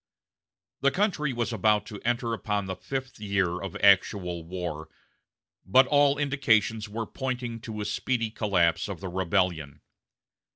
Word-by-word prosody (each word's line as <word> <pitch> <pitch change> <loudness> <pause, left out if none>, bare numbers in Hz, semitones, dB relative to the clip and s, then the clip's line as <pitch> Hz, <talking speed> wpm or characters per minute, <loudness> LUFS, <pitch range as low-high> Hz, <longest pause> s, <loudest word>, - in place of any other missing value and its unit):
The 140 - +4
country 170 -5 0
was 120 -1 -2
about 105 0 +2
to 105 -2 -9
enter 120 0 -1
upon 105 -2 -2
the 95 0 -4
fifth 130 +5 -5
year 100 -4 0
of 95 -3 -6
actual 90 -3 +3
war; 85 -2 -5 0.7
but 130 +8 +5
all 145 0 +3
indications 115 -7 +1
were 115 +2 -4
pointing 125 -3 -4
to 110 -2 -6
a - - -3
speedy 115 +2 -1
collapse 95 -7 +1
of - - -5
the 95 - -5
rebellion. 90 -5 -1
105 Hz, 140 wpm, -27 LUFS, 95-125 Hz, 0.7 s, but